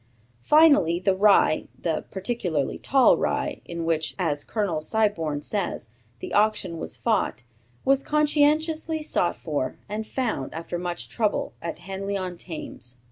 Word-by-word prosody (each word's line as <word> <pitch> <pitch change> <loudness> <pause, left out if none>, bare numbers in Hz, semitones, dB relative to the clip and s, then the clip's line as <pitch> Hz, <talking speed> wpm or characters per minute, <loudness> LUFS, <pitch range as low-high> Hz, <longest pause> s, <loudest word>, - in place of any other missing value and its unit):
Finally 290 - +5
the 190 +1 +2
rye, 200 -5 +4
the 165 -2 -1
'particularly 185 - -2
tall 270 -1 +4
rye' - - -1
in 170 -1 -5
which, 160 -1 0
as 150 -6 -1
Colonel 200 -8 -1
Siborne 165 -6 0
says, 185 - -3 0.3
the - - -6
action 205 -5 +1
was - - -5
fought, 215 - 0 0.4
was 275 0 +4
conscientiously 305 +2 +1
sought 175 - 0
for, 145 -5 -3
and 215 +2 -4
found, 225 - -2
after 170 +1 -4
much 175 -1 -4
trouble, 215 -3 -1
at 170 - -4
Henly 195 +2 -4
on 185 -1 -4
Thames." 145 -8 -7
190 Hz, 135 wpm, -25 LUFS, 165-235 Hz, 0.4 s, Finally